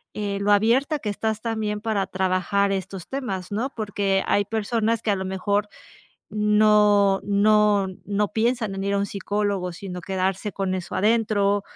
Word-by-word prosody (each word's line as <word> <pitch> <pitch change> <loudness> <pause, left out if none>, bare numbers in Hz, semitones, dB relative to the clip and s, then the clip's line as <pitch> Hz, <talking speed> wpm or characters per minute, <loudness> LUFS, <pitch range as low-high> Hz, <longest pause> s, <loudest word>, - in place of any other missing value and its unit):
eh, 200 -1 -3
lo 200 +1 +1
abierta 240 +9 +3
que 210 - -4
estás 220 +1 -2
también 220 -2 -2
para 210 -3 -1
trabajar 190 +2 0
estos 190 -1 -4
temas, 205 -10 -4
¿no?, 225 +6 -1
porque 200 -3 0
hay 205 - +2
personas 225 +1 -1
que 210 - +1
a - - +2
lo 190 - -4
mejor 200 +2 -1 0.7
no 210 -2 +4
no 205 -1 +3 0.2
no 205 0 0
piensan 225 -2 0
en 195 0 -4
ir 200 - 0
a - - +1
un 200 - +1
psicólogo, 200 -2 -2
sino 180 +1 -7
quedarse 190 +2 -2
con 195 -2 -2
eso 185 -2 -5
adentro 205 -2 +2
205 Hz, 165 wpm, -24 LUFS, 195-215 Hz, 0.7 s, no